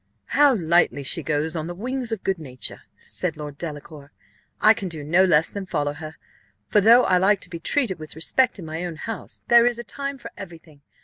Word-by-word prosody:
"How 290 -3 +5
lightly 170 -5 +2
she - - -1
goes 155 +2 -1
on 160 -1 -3
the 175 - -6
wings 250 +4 -3
of 220 -4 -4
good 190 -3 -1
nature!" 130 -5 -5 0.2
said - - -3
Lord 150 -2 -8
Delacour. 150 -2 -8 0.5
"I 215 - +7
can 205 -4 -5
do 160 -3 -6
no 170 +6 +4
less 160 -4 +3
than 200 -2 -6
follow 145 -5 -1
her; 155 +1 -9 0.5
for 210 - +3
though 235 +4 +7
I 185 - +3
like 195 +2 +3
to - - -11
be 170 - -6
treated 200 - 0
with 155 -1 -9
respect 250 +11 +1
in 180 - -8
my 160 +2 -5
own 175 -2 -4
house, 225 +8 -6
there 235 0 +6
is 240 -1 0
a 240 - -6
time 275 +6 -5
for - - -10
every 175 -4 -9
thing. 155 -3 -21
175 Hz, 225 wpm, -23 LUFS, 155-225 Hz, 0.5 s, I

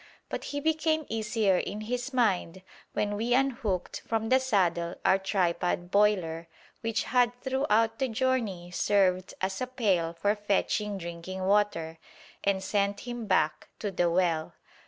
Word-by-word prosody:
But - - -4
he 285 - -3
became 315 0 +1
easier 215 -3 +1
in 210 +2 -4
his 245 +4 -3
mind 190 -7 0 0.3
when 205 0 0
we 235 +4 +1
unhooked 240 -9 -1
from 225 -1 -1
the 260 - +5
saddle 180 -9 +1
our 190 - +5
tripod 180 -2 0
boiler, 185 -6 +2 0.3
which 225 -1 -1
had 245 -1 +2
throughout 245 -4 +1
the 265 - +1
journey 225 -8 -1
served 185 -1 +1
as 190 +2 -2
a 255 - -1
pail 195 -10 +1
for 205 +5 +1
fetching 205 0 0
drinking 170 +1 -6
water, 190 -5 +1 0.4
and 195 -1 +1
sent 200 0 0
him 240 -2 -6
back 155 -5 +1
to 205 - -3
the 175 -2 +1
well. 170 -2 0
205 Hz, 145 wpm, -29 LUFS, 180-235 Hz, 0.4 s, the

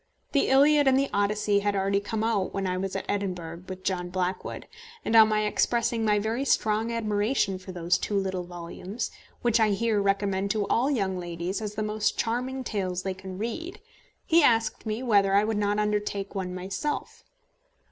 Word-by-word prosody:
The 280 - +2
Iliad 285 +2 +5
and 265 0 +5
the 275 0 0
Odyssey 205 0 +2
had 205 0 0
already 195 +1 +1
come 215 +2 -3
out 220 -4 0
when 195 0 -1
I 185 -1 0
was 190 +1 -3
at - - -3
Edinburgh 180 -4 -3
with 185 0 -7
John 180 -2 -1
Blackwood, 185 0 -3 0.4
and, 225 - +1
on 220 -1 +9
my 215 0 +1
expressing 235 +1 +1
my 210 -1 +3
very 220 +5 -1
strong 220 -3 +1
admiration 210 -2 0
for 185 0 -9
those 175 0 +1
two 205 - -2
little 190 -2 -1
volumes, 175 +5 -6 0.3
which 235 -1 +3
I 220 -1 +4
here 210 +1 +1
recommend 200 0 0
to 210 -2 0
all 255 +4 +2
young 195 -9 0
ladies 175 +3 -4
as 210 -1 -5
the 215 - -1
most 210 0 0
charming 250 +3 -1
tales 185 -5 -2
they 190 - -2
can 190 0 -9
read, 330 - -4 0.5
he 335 +1 +5
asked 225 -5 +2
me 220 +4 -2
whether 200 -5 +3
I 200 - +5
would 215 0 -1
not 205 0 +1
undertake 210 -1 -1
one 185 -2 -3
myself. 190 +11 -4
205 Hz, 190 wpm, -27 LUFS, 190-225 Hz, 0.5 s, on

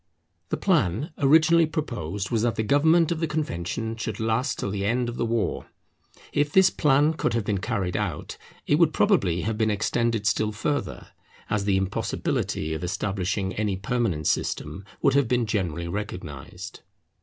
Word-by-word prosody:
The - - -1
plan 150 - +1
originally 160 +3 +5
proposed 105 - -4
was 115 -2 +1
that 120 0 +1
the 110 - 0
government 160 +7 +4
of 165 - -1
the 165 - 0
Convention 115 - -3
should 115 -1 -4
last 115 +3 0
till 100 - -3
the 100 -1 -2
end 120 +4 +1
of 120 - -6
the 115 - 0
war. 115 -1 -1 0.7
If 145 0 +1
this 190 +2 +5
plan 150 +1 +3
could 155 - -1
have 115 - 0
been 100 -2 0
carried 90 -2 -2
out, 100 -8 -3 0.3
it 145 - +2
would 160 -3 +4
probably 95 - +2
have 110 +2 -2
been 110 -1 +2
extended 110 +1 0
still 105 0 +1
further, 145 +5 -3 0.4
as 105 -2 0
the 100 -2 +2
impossibility 90 -4 -2
of 80 +2 -4
establishing 95 +1 -2
any 105 -3 -1
permanent 95 -6 -1
system 75 +7 -1 0.2
would 135 - +4
have 140 -3 +3
been 120 0 +1
generally 90 -6 -2
recognized. 90 -7 -6
110 Hz, 165 wpm, -25 LUFS, 95-140 Hz, 0.7 s, originally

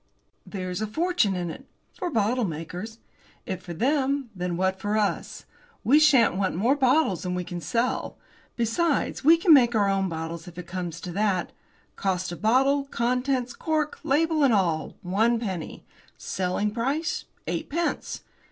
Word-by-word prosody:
"There's 185 -1 -4
a 215 - -1
fortune 315 - +1
in 175 -2 -3
it!" - - -11 0.3
"For 360 - -4
the 300 - -8
bottlemakers." 210 -2 -2 0.5
"If 185 -1 -4
for 175 -2 -7
them, 275 - 0
then 180 -1 -2
what 190 +1 0
for 205 +2 -1
us? 210 -2 -2 0.4
We 280 +6 +5
shan't 275 -10 +5
want 190 -2 0
more 235 +10 +2
bottles 265 - +2
than 180 -1 -3
we 180 - -2
can 175 0 -6
sell. 240 +6 -1 0.4
Besides, 280 +7 0
we 325 +4 +7
can 335 -1 +6
make 240 -4 +5
our 205 -2 +3
own 195 -1 +1
bottles 165 +1 -5
if 175 0 -11
it 180 - -6
comes 175 -2 -5
to 180 - -6
that. 195 -1 0 0.5
Cost 185 -2 -1
of 175 - -8
bottle, 270 +5 +3
contents, 250 0 -1
cork, 310 -2 -1
label, 310 +2 +2
and 255 -5 +5
all, 170 -5 0
one 220 +6 +2
penny. 190 -8 -5 0.3
Selling 190 +3 -1
price, 270 +9 -1 0.2
eightpence. 335 +3 -2
215 Hz, 160 wpm, -26 LUFS, 180-275 Hz, 0.5 s, we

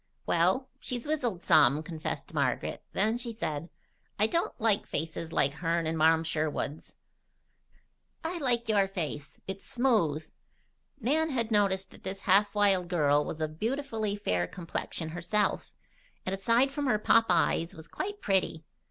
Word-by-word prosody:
"Well, 185 +10 +2
she's 245 -3 -4
wizzled 250 - -1
some," 150 0 +5
confessed 160 -1 -5
Margaret. - - -1
Then 220 +4 +1
she 240 -1 -4
said: 165 -7 -4 0.5
"I 210 - +4
don't 335 +7 -1
like 220 -3 +2
faces 160 +1 -4
like 140 -3 +2
hern 165 +2 -1
and 160 +1 -1
Marm 160 +1 +4
Sherwood's. 155 -2 -3 1.3
I 340 +2 -3
like 240 -5 +1
your 205 -3 +3
face. 150 -7 -5
It's 195 0 -5
smooth." 215 - +1 0.7
Nan 310 +7 +1
had 235 -5 -1
noticed 195 -2 +2
that - - -15
this 195 +1 -5
half 200 +2 +3
wild 195 -3 +3
girl 150 -4 +3
was 160 - -6
of 155 0 -3
beautifully 225 -4 -1
fair 90 - 0
complexion 165 - -4
herself, 175 +5 -1 0.5
and 185 - -1
aside 230 +7 +3
from 285 0 -2
her 245 - +3
pop 225 +2 +4
eyes 165 -1 +2
was 160 0 -11
quite 410 - -5
petty. 185 -5 0
195 Hz, 150 wpm, -29 LUFS, 160-230 Hz, 1.3 s, some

